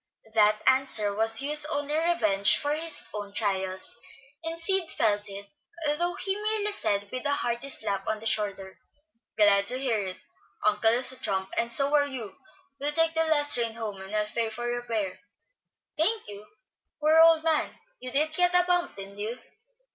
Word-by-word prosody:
That 215 -1 +3
answer 260 -6 +2
was 225 +2 +3
Hugh's 300 +1 +6
only 295 -1 -1
revenge 215 - +3
for 290 0 -2
his 320 +1 -1
own 205 -1 -7
trials, 190 -2 -3 0.5
and 330 +1 -4
Sid 375 0 -1
felt 205 -2 0
it, 200 0 -8 0.5
though 350 +3 -2
he 385 0 -2
merely 420 0 -1
said, 205 - -2
with 255 - -5
a 290 - -1
hearty 240 0 -2
slap 200 -6 -3
on 220 0 -2
the 225 - -11
shoulder, 200 -3 -2 0.6
"Glad 200 -2 +4
to 250 - +2
hear 240 -6 -1
it. 185 -1 -6 0.5
Uncle 210 +1 +3
is 245 +3 +1
a 260 - -5
trump, 190 -1 -3
and 235 0 -1
so 275 +4 +4
are 290 -1 +3
you. 230 -8 -7 0.4
We'll 290 +2 -2
take 325 +1 +2
the 325 0 +1
last 295 -2 +2
train 230 -2 -2
home, 210 -4 -6
and 190 +2 -7
I'll 210 0 +1
pay 225 +1 -3
your 240 +2 -3
fare." 215 -6 -4 0.8
"Thank 425 +8 +1
you. 205 0 -10 0.5
Poor 310 +1 +4
old 325 -1 +6
man, 320 -2 0 0.2
you 255 - -7
did 300 +4 0
get 355 +1 +4
a 360 - +7
bump, 355 -1 +1
didn't 195 +1 -10
you?" 220 +4 -4
240 Hz, 180 wpm, -27 LUFS, 205-310 Hz, 0.8 s, a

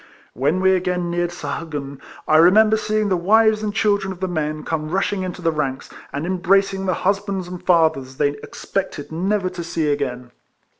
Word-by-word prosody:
When 145 +9 0
we 190 0 +4
again 180 -1 0
neared 175 0 0
Sahagun, 145 -6 -5 0.3
I 155 - +5
remember 215 +6 +6
seeing 215 -1 0
the 185 - +2
wives 215 +4 +3
and 210 -1 -2
children 200 -1 +1
of 185 - -8
the 190 - -1
men 155 -3 -3
come 155 -1 -3
rushing 195 +2 0
into 185 -1 -5
the 165 - +2
ranks, 140 -4 -3 0.2
and 145 +3 -3
embracing 195 +2 +1
the 185 - +1
husbands 195 -1 0
and 180 0 -7
fathers 160 -7 +2
they 145 -1 +2
expected 145 +2 -5
never 190 +4 0
to 180 -2 -6
see 165 -3 -1
again. 125 -4 -3
175 Hz, 180 wpm, -21 LUFS, 155-195 Hz, 0.3 s, remember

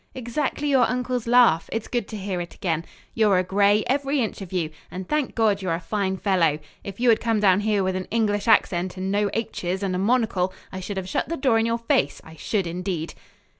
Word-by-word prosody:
"Exactly 260 +4 -2
your 265 -5 +4
uncle's 250 -1 -2
laugh. 240 -9 +4
It's 225 -1 -3
good 240 -4 -2
to 215 - -6
hear 190 -3 -3
it 175 - -8
again. 165 -2 -2 0.3
You're 210 -4 +3
a 180 - +2
Gray, 200 +3 +3
every 275 +2 0
inch 220 -4 -2
of 190 - -8
you; 170 -4 -1 0.2
and, 185 0 -7
thank 300 -3 -1
God, 215 -4 +2
you're 175 -3 -1
a - - -4
fine 190 +2 -2
fellow! 180 -7 +2 0.3
If 200 +1 -8
you 245 0 +3
had 225 - +5
come 225 -2 +1
down 195 -2 +4
here 205 -1 +1
with 185 0 -1
an 185 0 -3
English 210 -1 0
accent 185 -4 +2
and 190 +1 -2
no 205 0 +1
'h's' 190 -4 -3
and 190 -2 -1
a 180 - -1
monocle, 200 -4 +1 0.2
I 185 - -6
should 195 +1 -5
have 185 -1 -3
shut 190 - -2
the 335 - -2
door 255 -4 +3
in 225 - +1
your 230 0 0
face. 230 -11 0
I 160 - -13
should, 195 +4 -1
indeed." 170 -1 -4
205 Hz, 230 wpm, -24 LUFS, 185-230 Hz, 0.3 s, had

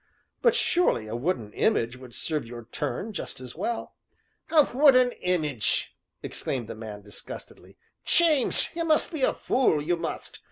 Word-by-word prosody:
"But 475 - +4
surely 345 - +2
a 110 +1 -5
wooden 120 - -2
image 115 +2 +1
would 125 -2 -11
serve 155 -7 -2
your 120 -1 -9
turn 210 - -3
just 180 - -6
as 125 -1 -10
well." 235 - -4 0.5
"A 310 -3 +6
wooden 255 -3 +6
image!" 150 -11 0 0.3
exclaimed 125 -4 -4
the - - -7
man 110 -2 -8
disgustedly. 105 0 -10 0.3
"James! 315 -7 +3
you 335 - -1
must 315 +1 +3
be 310 - -3
a - - +4
fool, 250 - +1
you 170 +4 0
must! - - -6
155 Hz, 155 wpm, -26 LUFS, -, 0.5 s, A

